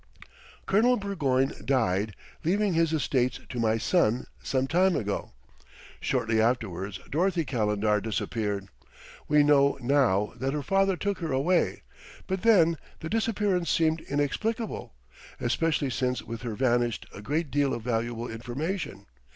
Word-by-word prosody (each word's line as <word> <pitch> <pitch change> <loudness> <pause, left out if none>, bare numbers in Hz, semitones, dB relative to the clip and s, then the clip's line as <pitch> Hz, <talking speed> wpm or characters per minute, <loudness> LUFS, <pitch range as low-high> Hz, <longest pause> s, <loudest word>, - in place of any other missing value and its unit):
"Colonel 240 +5 +4
Burgoyne 140 -10 0
died, 110 -6 +1 0.3
leaving 200 +3 +1
his 165 -1 +2
estates 125 -4 0
to 125 - -4
my 110 -1 +2
son, 125 -3 +2 0.2
some 130 -1 0
time 180 +5 +3
ago. 105 -2 -2 0.7
Shortly 110 0 +1
afterwards 100 -5 -1
Dorothy 170 +1 +1
Calendar 105 -4 +1
disappeared. 105 -2 -2 0.6
We 150 -1 +5
know 140 -1 +4
now 120 -6 +2
that 135 +2 -1
her 145 - -2
father 195 0 +2
took 200 +3 -2
her 165 -4 -3
away, 150 +7 +1 0.4
but 190 -1 -2
then 170 -8 +5 0.2
the 160 - -4
disappearance 205 -5 0
seemed 160 0 +2
inexplicable, 210 - -2 0.4
especially 145 +2 0
since 125 0 -1
with 115 +1 -7
her 120 -3 -4
vanished 120 -2 +1
a 100 - -9
great 150 +7 -2
deal 140 -1 +2
of 115 - -3
valuable 120 0 -2
information. 120 - -4
135 Hz, 135 wpm, -27 LUFS, 115-170 Hz, 0.7 s, We